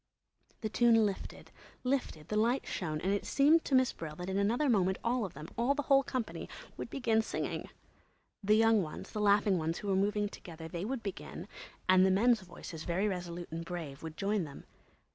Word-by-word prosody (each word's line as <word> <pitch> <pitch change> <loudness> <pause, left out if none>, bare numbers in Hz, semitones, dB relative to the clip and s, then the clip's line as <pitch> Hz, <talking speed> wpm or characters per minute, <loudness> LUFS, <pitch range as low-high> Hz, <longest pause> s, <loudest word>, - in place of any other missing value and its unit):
The 215 - -2
tune 225 -1 +5
lifted, 200 -2 -5 0.3
lifted, 250 - -2
the 210 - -1
light 235 +5 +2
shone; 155 -4 -3
and 195 +2 +1
it 205 - -1
seemed 305 +4 +4
to 270 - +2
Miss 255 -1 +4
Brill 155 -2 -7
that 180 +3 -5
in 195 - 0
another 235 +9 +2
moment 190 -6 +3
all 235 -1 +1
of 180 - -8
them, 150 +3 -8
all 255 +4 +3
the 290 - -1
whole 275 0 +5
company, 255 -4 -4 0.3
would - - -6
begin 230 -5 +2
singing. - - -3 0.7
The 210 +2 +4
young 225 -1 +5
ones, 155 -4 -6
the 210 - -3
laughing 205 -2 +4
ones 160 +1 -1
who 205 - -4
were 195 - +3
moving 205 +2 +1
together, 165 -5 -9
they 170 +3 -4
would 255 +1 -3
begin, 200 -2 -6 0.4
and 185 0 +6
the 190 - +5
men's 220 +4 +4
voices, 175 -3 -9
very 185 +4 0
resolute 175 -3 -4
and 165 +1 -4
brave, 165 -5 -6
would 160 -1 -7
join 200 -1 0
them. 140 -3 -9
200 Hz, 200 wpm, -32 LUFS, 175-230 Hz, 0.7 s, and